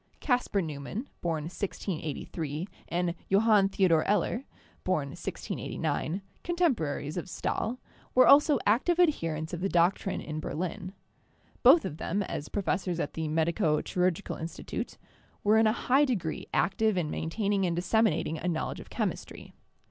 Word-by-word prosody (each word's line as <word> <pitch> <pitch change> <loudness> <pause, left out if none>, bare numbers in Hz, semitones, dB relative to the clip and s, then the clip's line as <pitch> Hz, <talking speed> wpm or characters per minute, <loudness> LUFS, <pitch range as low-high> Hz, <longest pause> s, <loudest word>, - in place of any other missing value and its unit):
Kaspar 245 -7 +1
Neumann 155 - -5
("born 165 -3 -1
1683) 160 -2 -4 0.2
and 175 0 0 0.2
Johann 205 0 +5
Theodor 180 -5 +3
Eller 210 +6 +1 0.4
(born 155 -7 0
1689), 175 +5 -3 0.2
contemporaries 220 - 0
of 175 - -4
Stahl, 225 +7 -2 0.4
were 255 - +7
also 295 +1 +7
active 260 - +3
adherents 165 - +1
of 175 - -3
the 195 - 0
doctrine 175 +3 +2
in 155 0 -5
Berlin. 180 +5 -4 0.7
Both 280 +6 +7
of 150 - -4
them, 200 +5 -1
as 150 -5 -5
professors 185 -3 -1
at 145 - -2
the 160 -1 -3
Medico 160 +1 +1
Chirurgical 180 +1 -1
Institute, 160 +1 -5 0.5
were 215 +2 +5
in 220 - +5
a - - +4
high 265 +5 +3
degree 185 - -2
active 215 0 +2
in 160 -4 -1
maintaining 195 +3 0
and 170 - -1
disseminating 180 -3 +1
a 180 - -3
knowledge 165 -3 -2
of - - -11
chemistry. - - -4
185 Hz, 140 wpm, -29 LUFS, 160-220 Hz, 0.7 s, were